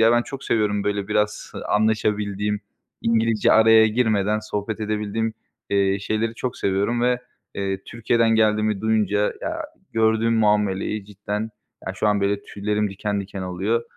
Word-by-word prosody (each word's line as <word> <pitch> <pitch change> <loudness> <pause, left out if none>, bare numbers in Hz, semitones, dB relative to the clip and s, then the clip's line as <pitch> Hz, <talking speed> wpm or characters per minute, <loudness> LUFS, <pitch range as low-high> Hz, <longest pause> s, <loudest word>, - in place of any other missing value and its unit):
ya, 115 +1 +6
ben 120 - +3
çok 135 +1 -8
seviyorum, 105 -2 +1
böyle, 100 -1 -1
biraz, 105 0 -1
ııı, - - -6
anlaşabildiğim, 105 -1 0 0.4
İngilizce 115 -1 +3
araya 110 0 +7
girmeden 110 -2 +1
sohbet 110 +1 -4
edebildiğim, 110 +1 -1 0.4
eee, 100 0 +2
şeyleri 110 +2 -1
çok 125 +1 -4
seviyorum 100 +5 0
ve, 125 0 +2 0.3
eee, 95 -1 -2
Türkiye'den 115 0 +1
geldiğimi 110 -2 +2
duyunca, 105 -2 +1
ya, 320 0 -3 0.3
gördüğüm 110 0 +2
muameleyi 105 -1 +1
cidden, 105 +2 -4 0.4
ya, 95 - -2
şu 100 - -1
an, 105 -1 +2
böyle, 100 0 0
tüylerim 105 0 -2
diken 100 +1 -2
diken 95 0 -6
oluyor. 95 +6 -1
105 Hz, 145 wpm, -23 LUFS, 100-110 Hz, 0.4 s, araya